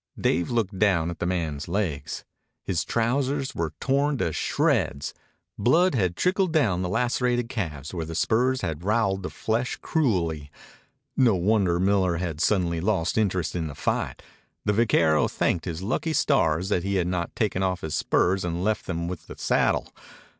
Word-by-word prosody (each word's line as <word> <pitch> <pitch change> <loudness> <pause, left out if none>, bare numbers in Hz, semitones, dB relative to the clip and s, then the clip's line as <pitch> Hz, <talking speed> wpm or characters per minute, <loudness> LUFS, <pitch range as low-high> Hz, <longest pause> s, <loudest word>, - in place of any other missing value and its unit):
Dave 85 - +1
looked 110 -5 -1
down 85 -5 +2
at 85 - -9
the 85 - -1
man's 80 -5 -2
legs. 85 -6 -3 0.4
His 90 -4 -1
trousers 135 +4 0
were 80 -2 -3
torn 140 +1 +1
to 85 -8 -1
shreds. 70 -1 0 0.5
Blood 165 - +4 0.2
trickled 185 - +1
down 115 - +2
the 90 - -2
lacerated 120 +2 0
calves 80 - -4
where 85 -2 -3
the 80 +1 -6
spurs 125 +8 +2
had 80 -2 -3
roweled 100 -2 +1
the 95 - -4
flesh 115 +3 -1
cruelly. 85 - 0 0.7
No 120 -6 +4
wonder 95 -2 +2
Miller 95 -2 +2
had 85 -3 -3
suddenly 85 -4 +1
lost 95 -3 0
interest 95 -7 0
in 85 -2 -1
the 70 - -7
fight. - - -2 0.4
The 105 - +2
vaquero 80 -9 +3
thanked 85 - -1
his 85 0 -4
lucky 155 - -1
stars 90 - +2
that 90 - +1
he 100 +2 -2
had 90 -2 +1
not 90 -1 -2
taken 100 -4 0
off 95 -1 0
his 80 -1 -4
spurs 95 +4 +1
and 85 0 -2
left 110 +1 -1
them 85 -1 -2
with 90 -3 -6
the - - -10
saddle. - - +1
95 Hz, 170 wpm, -25 LUFS, 85-115 Hz, 0.7 s, Blood